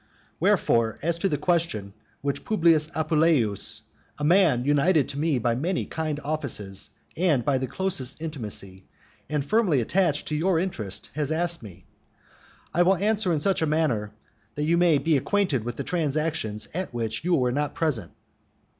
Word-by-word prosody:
Wherefore, 115 -2 +2
as 170 +1 0
to 195 - +1
the 150 - 0
question 160 - -1 0.3
which 140 0 -2
Publius 165 -7 +3
Appuleius 155 - +2 0.3
a 145 - -5
man 155 -7 +4
united 145 +2 +3
to 140 - -4
me 155 -3 +1
by 120 0 +1
many 170 +9 -1
kind 155 -2 -3
offices 135 -10 -4 0.3
and 155 -8 +1
by 135 -2 +2
the 130 - -2
closest 175 -9 -1
intimacy, 105 - -6 0.4
and 150 -2 -1
firmly 200 - +2
attached 155 - +1
to 150 - -1
your 170 +3 +1
interests 110 - -4
has 150 0 -2
asked 170 +1 +1
me, 95 -4 -12 0.9
I 175 - +2
will 185 +2 +5
answer 205 0 +1
in 160 - +1
such 190 +3 +1
a 160 - +2
manner 140 -10 0 0.4
that 150 - -2
you 165 +2 +3
may 170 -3 +4
be 160 +1 +2
acquainted 180 - 0
with 120 0 -4
the - - -4
transactions 155 -9 -1
at 185 +3 -3
which 115 0 -3
you 175 0 +2
were 125 -2 +1
not 145 +2 -2
present. 130 - -1
150 Hz, 165 wpm, -25 LUFS, 125-170 Hz, 0.9 s, will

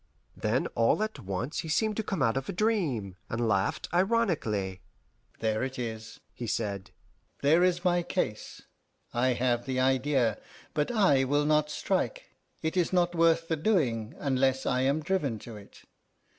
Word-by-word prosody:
Then - - 0
all 115 - +2
at 215 0 -4
once 100 - -3
he 160 - -4
seemed 215 +7 +1
to - - +1
come 200 -2 -1
out 115 - +2
of 135 0 -3
a - - -2
dream, 165 - 0
and 115 0 -1
laughed 100 -3 0
ironically. 165 - +1 0.6
"There 110 -1 0
it 130 0 -3
is," 110 -2 -6
he 120 - -6
said; 100 -4 -2 0.5
"there 160 +5 +5
is 180 0 +1
my 175 -1 +3
case. 140 - -3 0.5
I 125 +2 +2
have 120 0 0
the 130 -1 -1
idea, 130 -3 +2 0.3
but 150 -1 0
I 190 - +4
will 145 +2 +1
not 150 0 +2
strike; 195 - -2 0.3
it 160 +2 -1
is 180 -2 +1
not 175 -1 +2
worth 165 0 +3
the 165 - +1
doing 145 - 0
unless 130 -1 +1
I 125 0 +1
am 140 +4 +1
driven 150 -9 0
to 110 +2 -10
it. 100 -1 -14
135 Hz, 165 wpm, -29 LUFS, 115-175 Hz, 0.6 s, there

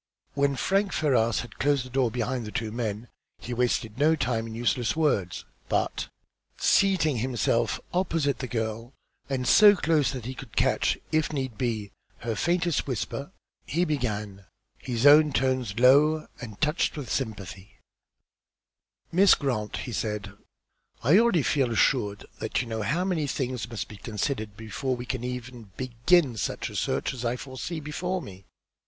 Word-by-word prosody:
When 140 -1 +1
Frank 195 +6 +1
Ferrars 120 -7 +2
had 115 - -12
closed 140 -2 +2
the 130 - -11
door 130 -2 +2
behind 125 +2 -2
the - - -6
two 110 -1 -3
men, 110 -1 -3 0.3
he 125 - -6
wasted 120 -1 -1
no 155 +2 +4
time 120 -5 -1
in 110 - -7
useless 120 +1 0
words, 120 - 0 0.2
but, - - -1 0.5
seating 180 -8 +3
himself 120 0 0
opposite 165 -7 0
the 130 - -3
girl, 115 +1 -3 0.4
and 130 -2 -1
so 205 - +8
close 160 -6 +2
that 125 -4 -6
he 130 - -4
could 130 -3 -11
catch, - - +2
if 155 0 +1
need 130 -5 -3
be, 110 -4 -2 0.3
her 115 0 -2
faintest 170 +3 0
whisper, 135 - -4 0.4
he 175 +3 +1
began, 105 - -3 0.3
his 120 0 -2
own 150 0 +7
tones 130 -6 0
low 145 +5 +5 0.2
and 110 -5 -8
touched 155 +1 +1
with 140 -4 -6
sympathy 100 -5 -5 1.3
"Miss 190 +3 +6
Grant," 115 -7 -2
he 125 - -6
said, 105 -2 -3 0.7
"I 155 - +6
already 215 -10 +3
feel 135 -4 +1
assured 105 -3 +1
that 110 - -1
you 125 - -1
know 110 -1 -3
how 150 - 0
many 165 -6 0
things 125 -3 -3
must 115 -3 -4
be 105 - -11
considered 110 0 -3
before 125 +4 -3
we 120 0 -7
can 125 -1 -4
ever 125 0 -4 0.3
begin 130 +2 +2
such - - -3
a - - -10
search - - -1
as 125 -2 -6
I 120 +1 0
foresee 135 +6 -6
before 180 +5 -3
me. 95 - -11
125 Hz, 160 wpm, -27 LUFS, 115-150 Hz, 1.3 s, so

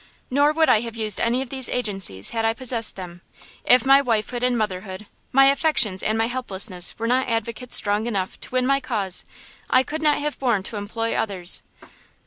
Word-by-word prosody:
"Nor 285 +3 +3
would 320 0 +2
I 215 - +5
have 230 0 -6
used 215 -3 +1
any 245 +3 +1
of 255 - -13
these 265 -2 +1
agencies 195 - -1
had 225 -1 -2
I 225 0 +1
possessed 235 -2 0
them! 175 -2 -9 0.4
If 250 +1 +4
my 275 +1 +6
wifehood 240 -1 -2
and 250 -1 +1
motherhood, 190 -1 -4 0.3
my 270 +1 +6
affections 275 - +2
and 215 +1 0
my 225 - +2
helplessness 200 -7 -2
were 230 - -4
not 250 +2 +1
advocates 230 +2 -1
strong 205 +2 0
enough 195 -5 -3
to - - -8
win 255 0 0
my 275 +1 +2
cause, 200 -8 -1 0.4
I 255 - +4
could 310 +4 -5
not 300 -1 +3
have 295 0 -4
borne 235 -7 0
to 210 - -6
employ 225 +3 -3
others!" 190 -5 0
230 Hz, 195 wpm, -22 LUFS, 205-255 Hz, 0.4 s, my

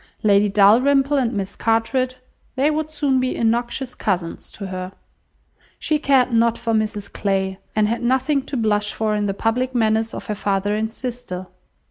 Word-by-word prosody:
Lady 205 -1 +4
Dalrymple 260 +8 +4
and 245 -4 +1
Miss 200 -2 -3
Carteret—they 255 +4 -1
would 310 0 -2
soon 290 -4 +1
be 255 0 -1
innoxious 240 +3 -1
cousins 180 -5 -3
to 200 - -7
her. 185 0 -6 0.8
She 305 -1 0
cared 265 -4 +3
not 230 0 +3
for 230 - -2
Mrs 215 -2 -2
Clay, 190 -1 -1 0.2
and 215 -1 +3
had 230 +2 -2
nothing 260 +4 +1
to 275 - -3
blush 210 -2 0
for 215 -1 0
in 210 -1 0
the 195 - -2
public 250 +4 -1
manners 220 -1 +1
of - - -7
her 210 - -2
father 200 0 -1
and 220 +1 -1
sister. 240 -7 -6
225 Hz, 165 wpm, -21 LUFS, 205-255 Hz, 0.8 s, Lady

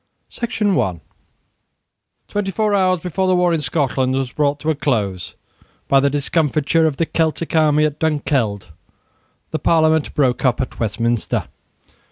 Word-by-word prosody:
The 235 - -3
Convocation 215 -3 -1
prorogued 90 - -1 1.3
TWENTY 205 -1 -2
four 210 +2 0
hours 185 -3 +2
before 185 +2 -1
the 185 - +3
war 180 -1 +2
in 160 - 0
Scotland 130 -2 0
was 135 -2 -2
brought 145 -1 0
to 160 - +1
a - - -1
close 105 -11 -2 0.5
by 135 - +4
the 140 +1 +2
discomfiture 155 +2 +1
of 145 -3 -2
the 165 - +1
Celtic 160 +1 -1
army 155 -1 +4
at 150 -1 -3
Dunkeld, 135 - -1 0.8
the - - -2
Parliament 160 -2 +2
broke 130 -4 +1
up 125 -3 +2
at 130 - -4
Westminster. 115 +1 -1
150 Hz, 155 wpm, -19 LUFS, 130-165 Hz, 1.3 s, by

